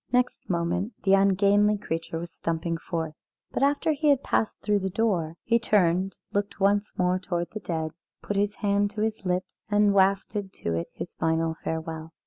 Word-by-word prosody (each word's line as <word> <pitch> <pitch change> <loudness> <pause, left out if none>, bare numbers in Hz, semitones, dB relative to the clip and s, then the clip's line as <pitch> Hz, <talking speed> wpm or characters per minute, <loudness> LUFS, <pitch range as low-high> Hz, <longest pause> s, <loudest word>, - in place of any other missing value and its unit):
Next 250 0 0
moment 180 +5 0
the 195 - +4
ungainly 200 +2 +4
creature 165 -3 -4
was 170 0 -6
stumping 165 0 -2
forth, 165 -2 -3 0.4
but - - -2
after 285 +3 +3
he 300 0 +1
had 280 -2 +4
passed 220 - 0
through 210 -1 +2
the 190 0 -2
door, 180 -6 0
he 235 0 +3
turned, 190 -3 +2 0.2
looked 205 0 -1
once 200 +1 +2
more 180 0 +2
towards 175 -2 -3
the 215 - -5
dead, 160 -5 -3 0.3
put 205 - -3
his 205 +1 +1
hand 205 0 +1
to 210 - -2
his 220 -1 -1
lips, 180 +1 -2
and 205 -1 +4
wafted 195 0 +1
to 85 - -3
it 85 0 -2
his 175 - -7
final 160 0 0
farewell. 160 0 -4
195 Hz, 180 wpm, -27 LUFS, 170-205 Hz, 0.4 s, the